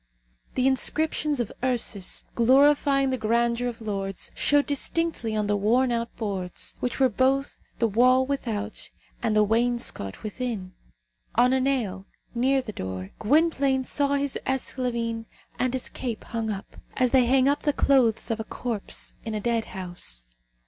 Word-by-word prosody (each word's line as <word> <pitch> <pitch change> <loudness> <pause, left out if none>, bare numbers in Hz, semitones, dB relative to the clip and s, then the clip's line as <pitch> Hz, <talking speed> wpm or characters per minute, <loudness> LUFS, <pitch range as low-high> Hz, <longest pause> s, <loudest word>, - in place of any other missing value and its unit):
The 255 - +1
inscriptions 300 +2 +1
of 240 - -2
Ursus, 235 -7 0
gloryifying 275 +2 +4
the 260 - -1
grandeur 235 +2 +1
of 235 -1 -6
Lords, 195 -3 -3
showed 290 0 +2
distinctly 290 -5 0
on 210 -1 0
the 205 0 +1
worn 240 +5 +2
out 235 0 -2
boards, 195 -5 -3
which 250 - -3
were 265 - +6
both 265 +4 +1 0.2
the 230 - +2
wall 255 +4 +4
without 225 -6 -3 0.3
and 225 -3 0
the 215 - +5
wainscot 230 - -1
within. 215 -4 -4 0.6
On 245 +2 +4
a 265 - +3
nail, 220 -8 -1 0.3
near 260 +3 +2
the 215 -4 -7
door, 95 - -5
Gwynplaine 275 0 +2
saw 285 +2 +1
his 280 -1 -1
esclavine 235 -3 -1 0.3
and 255 0 +1
his 260 0 -2
cape 235 -4 -5
hung 225 -1 -3
up, 200 -2 -6 0.2
as 250 -1 +3
they 255 -3 +4
hang 260 +1 +4
up 285 +1 +2
the 295 - +2
clothes 245 -6 +2
of 225 - -1
a - - -2
corpse 225 -2 -2
in 220 -1 -4
a - - -1
dead 230 +1 0
house. 175 - -5
240 Hz, 155 wpm, -26 LUFS, 215-265 Hz, 0.6 s, were